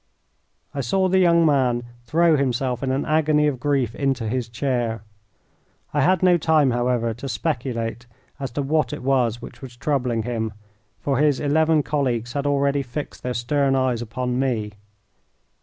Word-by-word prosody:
I 140 - -2
saw 190 +10 +1
the 190 +1 +3
young 170 -2 +4
man 130 -5 +2 0.2
throw 165 +5 +3
himself 130 -2 0
in 130 - -1
an 135 +2 -1
agony 155 -1 +2
of 140 -4 0
grief 135 -4 0
into 135 -4 -1
his 120 +1 -2
chair. 120 -3 -2 0.9
I 145 - +2
had 185 +5 +3
no 180 -1 +5
time, 150 -4 +3
however, 120 -1 0
to 125 +5 -7
speculate 115 0 -3 0.3
as 135 -2 -3
to 145 - -1
what 155 +2 0
it 150 - -6
was 125 -3 +1
which - - -10
was 125 -3 -10
troubling 125 -5 0
him, 110 -2 -3 0.5
for 135 -2 -1
his 145 -3 +3
eleven 155 +1 +2
colleagues 125 -6 -1
had 140 0 -1
already 140 0 +1
fixed 135 +3 -6
their 125 0 -3
stern 135 +3 +1
eyes 130 -3 +1
upon 125 +2 -3
me. 115 -6 -1
135 Hz, 165 wpm, -23 LUFS, 120-145 Hz, 0.9 s, no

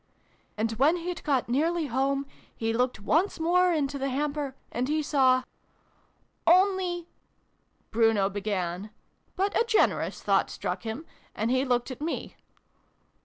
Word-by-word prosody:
" - - -38
And 220 +1 0
when 300 +6 +5
he'd 350 0 -5
got 275 -5 +1
nearly 320 +7 +1
home, 275 +2 0 0.3
he 225 0 -1
looked 250 -1 0
once 325 - +1
more 360 +2 +3
into 285 -3 -1
the 275 +1 -1
hamper, 285 0 -2 0.2
and 245 +2 -1
he 305 +1 0
saw 260 -3 +3 0.5
" - - -40
Only 370 -3 0 0.4
" - - -43
Bruno 225 -3 +3
began, 195 -1 -3 0.5
but 395 +2 0
a - - +4
generous 460 -2 +1
thought - - +2
struck - - -4
him, 230 +8 -5 0.3
and 220 +3 0
he 260 +1 +2
looked 245 0 0
at 255 - -8
me. 325 +2 -4
275 Hz, 150 wpm, -27 LUFS, 235-330 Hz, 0.5 s, when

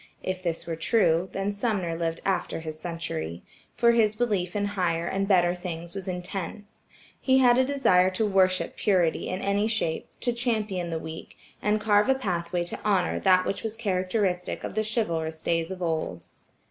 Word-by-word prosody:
If 185 0 -3
this 170 -3 -2
were 165 - -3
true, 175 -1 +2
then 195 +1 -1
Sumner 200 -5 -1
lived 165 0 -2
after 190 -3 -1
his 155 -1 -6
century, 85 - -4 0.3
for 235 0 +5
his 220 -2 +3
belief 205 -6 -1
in 205 -1 +1
higher 170 -4 0
and 195 +2 -1
better 175 -3 +4
things 170 -2 -6
was 195 -1 -6
intense. 185 +2 -6 0.3
He 260 -1 +3
had 250 -1 +5
a - - +5
desire 255 -10 +3
to 190 +4 0
worship 190 -2 +2
purity 180 -6 +1
in 185 +1 -3
any 200 +2 +1
shape, 215 -8 -1
to 245 - +1
champion 215 -7 -1
the 165 - -2
weak, 160 0 -8 0.2
and 210 +1 +2
carve 210 +2 +3
a 265 - +5
pathway 175 -7 -2
to 175 - -5
honor 195 -4 +1
that 185 -1 +4
was 220 +2 -3
characteristic 185 -2 -1
of - - -4
the 215 - 0
chivalrous 165 -8 -2
days 165 0 0
of 185 -1 -5
old. 155 - -3
185 Hz, 175 wpm, -27 LUFS, 170-210 Hz, 0.3 s, for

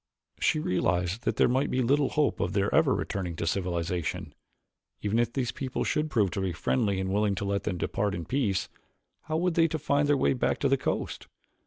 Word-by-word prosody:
She - - +2
realized 90 - 0
that - - +1
there - - +4
might 130 +3 +1
be 130 0 +1
little 140 +3 +2
hope 150 -2 +1
of - - -1
their - - +1
ever - - +4
returning 90 -4 -3
to 85 - -3
civilization. 85 -1 -2 0.7
Even 105 +2 +1
if 120 -1 +1
these 125 -2 -1
people 130 -2 -3
should 155 +1 0
prove 105 - +2 0.2
friendly 100 0 0
and 95 0 -2
willing 105 -1 +2
to 100 - -3
let 100 0 -1
them 90 - -1
depart 100 +3 -1
in 85 - -5
peace, 115 - 0 0.6
how 155 0 -1
were 180 +2 +1
they 165 0 +3
to 160 - -2
find 145 -1 +1
their 145 - +4
way 70 - +2
back 65 - 0
to - - +2
the - - +4
coast? - - -3
105 Hz, 205 wpm, -28 LUFS, 90-140 Hz, 0.7 s, there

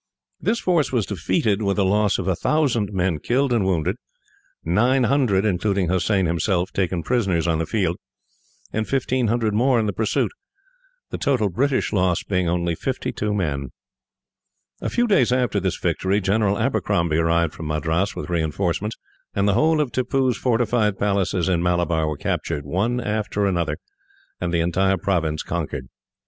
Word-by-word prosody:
This 230 +1 0
force 170 -5 +1
was 120 -6 +1
defeated, 100 +2 0
with 100 -1 0
a 100 - +3
loss 105 +1 +2
of 95 - -3
1000 115 - +1
men 90 -4 0
killed 130 - +1
and 115 -4 +2
wounded, 90 -5 0 0.7
900, 120 - +2
including 100 -2 0
Hossein 95 +1 +1
himself, 85 +2 0
taken 90 -3 -1
prisoners 95 -9 0
on 80 -2 +1
the 80 - -2
field, 90 -6 0 0.8
and 110 0 -1
1500 120 -4 +1
in 120 0 +3
the 100 - -1
pursuit; 110 +2 0 0.8
the - - -4
total 125 -7 +1
British 130 +9 0
loss 90 -3 +1
being 90 -3 0
only 85 0 0
52 105 +5 -3
men. 75 -10 -2 1.1
A - - -2
few 240 - +1
days 145 - +3
after 125 -5 +1
this 95 -2 -1
victory, 95 +4 0
General 100 +1 +1
Abercrombie 85 -2 0
arrived 85 0 +2
from 80 - -7
Madras 80 +6 -1
with - - -5
reinforcements, 85 +5 -1 0.4
and 100 0 +2
the 100 - +3
whole 155 +8 +3
of 145 -5 0
Tippoo's 130 +1 +1
fortified 115 -3 +1
places 95 -3 0
in 90 -3 +1
Malabar 85 -2 +1
were 75 -1 -3
captured, 75 0 -2
one 105 +11 0
after 105 -2 -1
another, 85 -4 0 0.6
and 85 - -2
the 85 -1 +1
entire 95 +3 +1
province 80 -5 -1
conquered. 75 -6 -4
100 Hz, 155 wpm, -22 LUFS, 85-115 Hz, 1.1 s, a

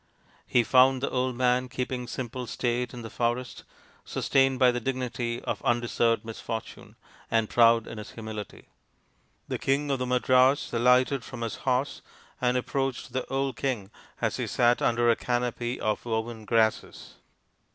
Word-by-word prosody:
He 120 - +3
found 130 +2 +4
the - - -1
old 130 -1 0
man 125 +1 +1
keeping 125 0 -3
simple 125 +1 -5
state 120 +2 -1
in 120 -1 -8
the 115 - -7
forest, 120 0 -2 0.4
sustained 135 -1 +1
by 125 -1 +5
the 125 - -2
dignity 120 -2 -3
of - - -3
undeserved 120 -2 +1
misfortune, 115 0 -7 0.3
and 115 -1 +1
proud 115 -1 +5
in 115 - -8
his 105 - -8
humility. 110 -3 -8 0.8
The - - -3
King 140 +1 0
of 135 - 0
the 125 - -2
Madras 130 +2 +3
alighted 125 +2 +3
from 120 -2 -8
his 115 -1 -3
horse 130 +2 0 0.4
and 125 0 +2
approached 135 -1 -2
the 130 - -2
old 135 -2 -1
king 115 -8 -2 0.3
as - - -1
he - - -2
sat 120 0 +2
under 120 0 +2
a - - +3
canopy 120 0 -2
of 105 -1 -1
woven 110 -1 -3
grasses. 110 -1 0
125 Hz, 155 wpm, -27 LUFS, 115-130 Hz, 0.8 s, by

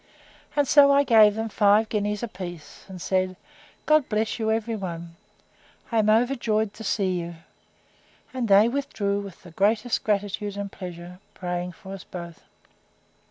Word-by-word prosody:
And 290 -2 +2
so 280 0 +7
I 280 0 +5
gave 215 -5 +6
them 225 +1 -2
five 210 +1 +3
guineas 210 0 -2
a - - -1
piece, 175 -6 -9
and 190 -2 -9
said, 185 +1 0 0.5
God 305 -3 +3
bless 220 +2 -1
you 220 -1 0
every 225 +1 -1
one! 170 -4 -6 0.8
I 230 - +2
am 215 0 +2
overjoyed 220 -2 +1
to 220 - -10
see 190 -3 0
you! 170 0 -6 1.0
And 255 -3 -2
they 200 +2 +6
withdrew 220 -6 -1
with 200 -3 -10
the 175 - -13
greatest 215 +6 +1
gratitude 205 0 -1
and 200 -1 -4
pleasure, 180 0 -9 0.2
praying 180 0 -4
for 190 +3 -10
us 195 - -8
both. 170 -2 -9
205 Hz, 160 wpm, -25 LUFS, 185-225 Hz, 1.0 s, so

